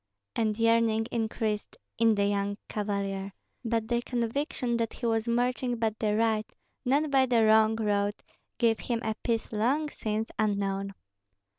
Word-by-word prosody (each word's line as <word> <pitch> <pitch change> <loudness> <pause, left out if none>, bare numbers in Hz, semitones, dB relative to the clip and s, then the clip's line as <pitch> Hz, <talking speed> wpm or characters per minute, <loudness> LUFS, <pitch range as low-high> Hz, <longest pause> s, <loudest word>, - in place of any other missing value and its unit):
And 215 -2 0
yearning 230 -1 +3
increased 220 -2 -2 0.2
in 225 -1 +5
the 200 0 +2
young 200 0 0
cavalier; 200 -2 -3 0.3
but 225 -1 -1
the 240 0 +1
conviction 240 +1 -1
that 230 -1 -1
he 240 - -6
was 225 0 +1
marching 245 +1 0
by 225 -1 +1
the 210 -1 +1
right, 220 -1 +1 0.3
not 285 +3 +2
by 265 -1 +4
the 235 -3 +4
wrong 220 0 +5
road, 205 -2 0 0.4
gave 225 -3 +2
him 235 -2 -2
a 220 - 0
peace 230 -2 -1
long 260 +8 +1
since 220 +1 -3
unknown. 200 -2 0
225 Hz, 150 wpm, -29 LUFS, 210-235 Hz, 0.4 s, in